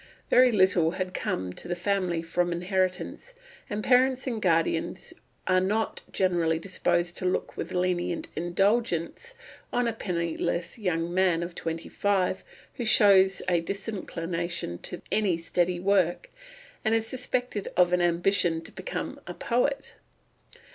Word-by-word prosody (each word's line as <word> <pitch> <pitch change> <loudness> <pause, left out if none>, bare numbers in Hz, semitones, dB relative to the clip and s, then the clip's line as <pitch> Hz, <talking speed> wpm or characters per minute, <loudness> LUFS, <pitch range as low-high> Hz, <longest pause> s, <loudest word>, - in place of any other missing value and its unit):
Very 250 0 +6
little 185 -5 +4
had 185 -1 -3
come 90 0 -2
to - - -9
the 175 - -1
family 180 -2 0
from 175 +1 0
inheritance, 185 - -2 0.3
and 210 +1 -3
parents 260 +1 +3
and 235 -5 -3
guardians 165 0 0 0.3
are 185 0 +3
not 215 +4 -1
generally 170 -4 +1
disposed 175 -1 -1
to 185 - -1
look 180 - -1
with - - -5
lenient 180 -1 -1
indulgence 195 - 0 0.4
on 245 -1 +1
a 230 - 0
penniless 170 -1 -2
young 175 -4 -1
man 180 -2 +2
of 170 0 -6
twenty 165 0 -4
five 190 -2 0 0.3
who 245 - -2
shows 195 -4 +5
a 175 -2 +2
disinclination 170 - -4
to 180 - -4
any 200 -6 +2
steady 175 +1 0
work, 195 - +1 0.5
and 220 0 +2
is 225 -1 +1
suspected 250 -3 -2
of 180 0 +4
an 180 - +3
ambition 175 0 +2
to - - -11
become - - -5
a - - -6
poet. 250 +4 -1
185 Hz, 140 wpm, -27 LUFS, 170-210 Hz, 0.5 s, Very